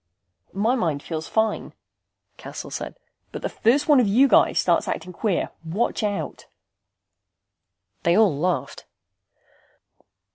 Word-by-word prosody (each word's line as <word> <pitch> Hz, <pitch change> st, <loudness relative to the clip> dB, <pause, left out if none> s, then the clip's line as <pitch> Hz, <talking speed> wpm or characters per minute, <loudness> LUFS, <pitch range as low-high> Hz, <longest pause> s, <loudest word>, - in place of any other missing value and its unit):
"My 220 Hz, +5 st, +2 dB
mind 165 Hz, -, -1 dB
feels 160 Hz, -1 st, -5 dB
fine," 220 Hz, -1 st, -1 dB, 0.6 s
Cassel -, -, -8 dB
said. -, -, -6 dB, 0.3 s
"But -, -, -7 dB
the -, -, -1 dB
first 265 Hz, +6 st, +2 dB
one 295 Hz, -3 st, +6 dB
of 240 Hz, -, +3 dB
you 245 Hz, +8 st, +5 dB
guys 235 Hz, -, +4 dB
starts 170 Hz, -2 st, +2 dB
acting 180 Hz, +2 st, -4 dB
queer 200 Hz, -1 st, -1 dB
watch 185 Hz, +11 st, -1 dB
out." 205 Hz, -2 st, -3 dB, 1.5 s
They 170 Hz, +2 st, +3 dB
all 210 Hz, -8 st, +4 dB
laughed. 145 Hz, -3 st, -2 dB
200 Hz, 120 wpm, -23 LUFS, 165-225 Hz, 1.5 s, one